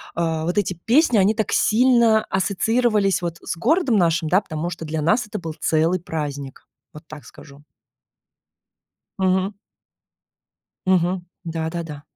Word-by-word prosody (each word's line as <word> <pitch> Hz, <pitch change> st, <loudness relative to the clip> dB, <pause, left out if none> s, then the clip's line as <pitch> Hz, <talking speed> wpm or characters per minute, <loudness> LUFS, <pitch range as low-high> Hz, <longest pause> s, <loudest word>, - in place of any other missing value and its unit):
А, 165 Hz, -2 st, -1 dB
вот 175 Hz, +4 st, -2 dB
эти 200 Hz, -2 st, +1 dB
песни 235 Hz, -, +2 dB
они 200 Hz, +3 st, +3 dB
так 220 Hz, -2 st, -2 dB
сильно 235 Hz, -1 st, +4 dB
ассоциировались 200 Hz, +1 st, +1 dB
вот 170 Hz, -1 st, -4 dB
с -, -, -4 dB
городом 275 Hz, -, +2 dB
нашим, 170 Hz, -2 st, +1 dB
да 185 Hz, +4 st, +4 dB
потому 160 Hz, -3 st, -4 dB
что 170 Hz, -, -7 dB
для 155 Hz, 0 st, -3 dB
нас 210 Hz, +8 st, +2 dB
это -, -, -5 dB
был 160 Hz, -3 st, -6 dB
целый 165 Hz, +3 st, +1 dB
праздник. 145 Hz, -5 st, -6 dB, 0.3 s
Вот 150 Hz, -, -11 dB
так 155 Hz, -1 st, -11 dB
скажу. 140 Hz, 0 st, -15 dB, 1.6 s
Мгм. 190 Hz, +1 st, +1 dB, 1.3 s
Мгм. 180 Hz, -1 st, +1 dB, 0.2 s
Да 165 Hz, -1 st, -3 dB
да 170 Hz, 0 st, -4 dB
да. 150 Hz, -3 st, -9 dB
180 Hz, 145 wpm, -21 LUFS, 160-210 Hz, 1.6 s, сильно